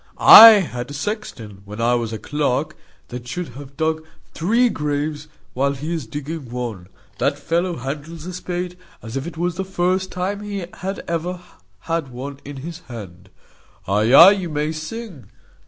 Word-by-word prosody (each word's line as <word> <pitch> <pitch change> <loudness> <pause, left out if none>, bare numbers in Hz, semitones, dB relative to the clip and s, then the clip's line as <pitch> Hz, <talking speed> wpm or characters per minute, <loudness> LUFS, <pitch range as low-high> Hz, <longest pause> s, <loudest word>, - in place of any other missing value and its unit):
I 225 - +12
had 125 -7 -5
a 145 - -7
sexton, 135 - -5
when 105 +2 -10
I 120 +1 +2
was 120 -2 -1
clerk, 150 +1 -1 0.3
that 125 0 -8
should 175 +6 -4
have 140 +2 -12
dug 160 0 -1 0.3
three 230 +9 +2
graves 150 -4 -3 0.3
while 140 +2 +1
he 150 +5 -5
is 155 -8 -4
digging 145 +1 -6
one. 115 -7 -5 0.3
The - - +3
fellow 170 +4 -1
handles 150 +5 -6
a 185 - -6
spade 180 0 -5 0.2
as 115 +2 -8
if 135 +4 -3
it 170 - -8
was 175 0 -2
the 190 - -1
first 185 0 -1
time 190 +3 -3
he 200 -3 -5
had 195 +1 -5
ever 170 +2 -3 0.4
had 165 +1 -2
one 135 +2 -8
in 145 0 -9
his 170 0 -7
hand. 95 -6 -10 0.6
Ay, 105 +4 +2
ay, 165 +8 +10
you 190 -4 -2
may 150 0 -1
sing. 160 - -8
155 Hz, 170 wpm, -21 LUFS, 125-180 Hz, 0.6 s, I